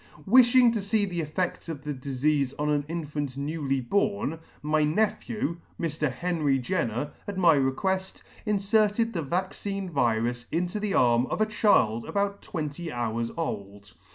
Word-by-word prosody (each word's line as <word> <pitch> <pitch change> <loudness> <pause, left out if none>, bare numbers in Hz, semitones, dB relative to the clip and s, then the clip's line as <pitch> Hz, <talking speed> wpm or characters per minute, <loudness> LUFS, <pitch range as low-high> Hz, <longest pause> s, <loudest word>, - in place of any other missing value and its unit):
Wifhing 245 +2 +6
to 220 - -1
fee 205 +1 +1
the 175 -3 -3
effeds 175 +3 -3
of 145 -3 -6
the 150 0 -3
difeafe 140 +1 0
on 150 0 0
an 145 -1 +1
infant 150 -5 -4
newly 140 -1 -1
born, 180 - 0 0.2
my 155 +1 +2
nephew, 210 0 0 0.2
Mr. 155 -3 -1
Henry 150 -1 0
Jenner, 130 - -2 0.2
at 200 -2 -4
my 175 -3 +6
requelt, 185 +8 -1 0.2
inferted 210 +2 +2
the 170 - -1
vaccine 190 +4 -3
virus 120 -3 0
into 175 +5 -1
the 210 -2 -1
arm 120 0 +4
of - - -3
a 215 - +4
child 160 - +2
about 200 0 -1
twenty 160 0 -5
hours 115 -1 -2
old. 100 -10 -5
160 Hz, 150 wpm, -27 LUFS, 135-195 Hz, 0.2 s, Wifhing